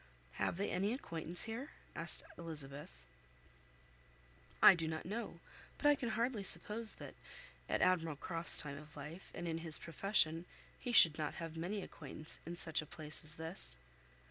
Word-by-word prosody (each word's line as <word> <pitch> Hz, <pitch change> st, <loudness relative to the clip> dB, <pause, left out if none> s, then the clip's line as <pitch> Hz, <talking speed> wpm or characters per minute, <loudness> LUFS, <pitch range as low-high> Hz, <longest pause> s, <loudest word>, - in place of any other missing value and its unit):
"Have -, -, -1 dB
they 200 Hz, -, -2 dB
any 195 Hz, +5 st, 0 dB
acquaintance 170 Hz, -, -4 dB
here?" 235 Hz, +6 st, -6 dB, 0.2 s
asked -, -, +3 dB
Elizabeth. 150 Hz, -4 st, -5 dB, 1.7 s
"I -, -, +9 dB
do 165 Hz, -3 st, -3 dB
not 160 Hz, 0 st, -5 dB
know; 215 Hz, +6 st, -5 dB, 0.4 s
but -, -, -8 dB
I 290 Hz, -, +7 dB
can 260 Hz, -4 st, -3 dB
hardly 230 Hz, -1 st, -1 dB
suppose 215 Hz, +3 st, +8 dB
that, -, -, -10 dB, 0.6 s
at -, -, +1 dB
Admiral 165 Hz, -4 st, +1 dB
Croft's 165 Hz, +3 st, -2 dB
time 140 Hz, -2 st, -4 dB
of 150 Hz, 0 st, -14 dB
life, 150 Hz, +6 st, -9 dB
and 175 Hz, -, -5 dB
in 165 Hz, 0 st, -3 dB
his 160 Hz, -2 st, 0 dB
profession, 165 Hz, -1 st, 0 dB, 0.3 s
he 245 Hz, -, -4 dB
should 165 Hz, -8 st, +6 dB
not 150 Hz, -1 st, -3 dB
have 165 Hz, -1 st, -7 dB
many 185 Hz, +5 st, -4 dB
acquaintance 155 Hz, +1 st, -5 dB
in 170 Hz, -, -5 dB
such 160 Hz, -2 st, -1 dB
a 155 Hz, -, -11 dB
place 150 Hz, 0 st, -4 dB
as 155 Hz, +1 st, -3 dB
this." 60 Hz, -, -5 dB
165 Hz, 165 wpm, -36 LUFS, 155-200 Hz, 1.7 s, I